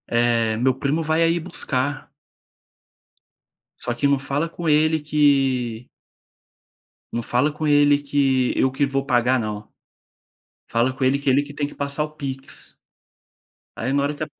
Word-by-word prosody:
eh, 115 -2 +2
meu 130 +2 +2
primo 140 +4 -1
vai 160 +1 +1
aí 165 +1 +2
buscar." 140 -5 -3 1.7
Só 120 - -2
que 130 +4 0
não 140 -1 +3
fala 140 +4 -2
com 170 0 -5
ele 155 +1 +3
que 135 -6 +1 1.2
não 120 - -2
fala 130 +6 +1
com 155 +1 -4
ele 145 -1 +5
que 135 -3 +1
eu 130 - +3
que 140 +1 +1
vou 135 0 -1
pagar 125 0 +2
não, 105 -2 -5 1.0
fala 120 +3 +1
com 130 +1 -3
ele, 135 +2 +3
que 140 - +1
ele 140 +2 +4
que 145 - -11
tem 145 0 -1
que - - -13
passar 140 +1 -1
o 155 - -7
PIX. 135 -3 -5 1.0
Aí 130 +4 -2
na 140 0 +2
hora 145 +1 -1
que 155 - -6
a - - -1
140 Hz, 165 wpm, -22 LUFS, 130-145 Hz, 1.7 s, ele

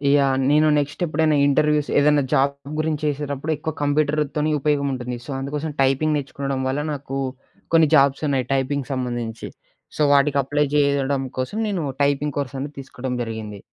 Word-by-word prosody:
Yeah! 140 -2 +3
నేను 150 +1 +4
నెక్స్టెప్పుడైనా 155 +1 0
interviews, 150 +1 +2
ఏదన్నా 145 0 +4
job 140 +1 +3 0.3
గురించేసేడప్పుడెక్కువ 150 0 -2
కంప్యూటరుతోని 150 +1 +1
ఉపయోగముంటుంది. 135 -4 -1
So, - - -7
అందుకోసం 145 +3 -3
టైపింగ్ 135 +3 +2
నేర్చుకొనడం 140 -1 -3
వల్ల 140 +3 -1
నాకూ, 135 -1 -4 0.5
కొన్ని 160 -2 +5
జాబ్సున్నాయి 140 -2 +2
టైపింగ్ 135 0 -1
సంబంధించి. 120 -3 -4 0.5
సో, - - -1
వాటికి 140 0 +3
అప్లై 145 +3 +1
జేయడం 140 -1 +2 0.2
కోసం 130 +12 -2
నేనూ 185 -7 -2 0.2
టైపింగ్ 145 0 0
కోర్సనేది 140 +1 -4
తీసుకోడం 130 -1 -5
జరిగింది. 110 -3 -6
140 Hz, 125 wpm, -22 LUFS, 135-150 Hz, 0.5 s, కొన్ని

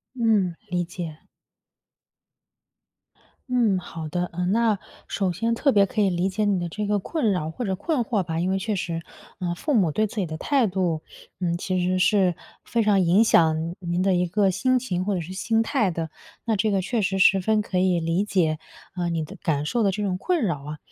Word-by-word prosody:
嗯， 215 -7 +2 0.2
理 175 -1 0
解。 170 -4 -7 2.3
嗯， 225 -7 +3
好 165 -3 -7
的， 180 0 -1
嗯， 180 +2 0
那 225 -3 +2 0.3
首 190 -3 -1
先 230 +6 0
特 275 +3 +2
别 200 -2 +5
可 215 -2 0
以 195 - +3
理 175 +2 0
解 210 +2 -1
你 200 -3 +1
的 175 - -3
这 210 +4 -3
个 205 0 +1
困 230 - 0
扰 160 -3 -2
或 245 +8 -5
者 190 -2 -1
困 265 - -1
惑 210 -4 0
吧， 165 -1 -3
因 185 +2 0
为 195 - +1
确 210 +1 -2
实， 165 -2 -3 0.4
呃， 175 -2 -2
父 295 - -2
母 190 - +3
对 215 +7 +1
自 220 - -11
己 190 -4 0
的 155 0 -5
态 270 - +2
度， 180 -4 -1 0.4
嗯， 170 -1 0
其 185 0 -1
实 185 +1 +1
是 190 -2 +3 0.3
非 230 -1 +1
常 205 -2 +3
影 185 +6 +4
响 160 -3 +3
您 175 0 -1
的 190 -1 +3
一 180 0 +2
个 195 +2 +2
心 255 +6 +2
情 185 -8 -2
或 200 +1 -1
者 175 - -2
是 180 +4 -8
心 225 +4 +1
态 210 -3 +1
的， 165 -2 -4 0.3
那 225 -2 +1
这 215 +2 +1
个 195 -2 +1
确 230 +3 -1
实 190 0 0
十 190 0 +5
分 215 +2 +2
可 185 -2 -2
以 180 -2 +2
理 165 +4 +1
解， 170 -7 +1 0.4
嗯， 175 -2 -2
你 160 -1 -1
的 195 - -10
感 150 -5 0
受 235 +8 0
的 200 - +3
这 210 +2 -3
种 185 -2 -1
困 350 - 0
扰 160 -9 -1
啊。 150 0 -6
190 Hz, 235 characters per minute, -24 LUFS, 175-210 Hz, 2.3 s, 别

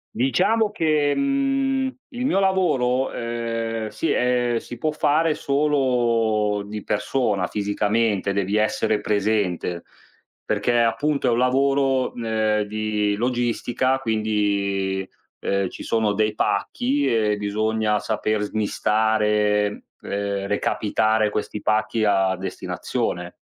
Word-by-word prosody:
Diciamo 200 - +2
che, 155 -6 +1
mhmm, 275 -1 0
il 250 -2 -4
mio 195 -7 +2
lavoro, 135 -10 +1
ehm, 115 -1 -3
si 110 +10 -2
ehm, 125 -1 +1
si 120 - -7
può 155 - -1
fare 155 +1 +2
solo 120 -8 +1
di 105 0 -6
persona 105 -2 0
fisicamente, 105 -1 0
devi 100 +1 -1
essere 110 0 +1
presente, 100 -5 -1 0.6
perché 110 +3 +1
appunto 140 +6 +1
è - - +4
un 115 - +1
lavoro, 135 +1 +2
ehm, 110 -2 0
di 105 0 -1
logistica 120 +2 0
quindi, 100 -4 -1 0.3
ehm, 100 -1 -1
ci - - -9
sono 110 -2 +1
dei 105 +1 +1
pacch,i 250 - 0 0.3
e - - -2
bisogna 105 +1 0
saper 110 0 -1
smistare, 105 0 +1 0.2
ehm, 100 -1 -3
recapitare 110 +1 +1
questi 105 0 -4
pacchi 110 +1 +1
a 95 -2 +2
destinazione. 95 0 -4
110 Hz, 110 wpm, -23 LUFS, 105-130 Hz, 0.6 s, è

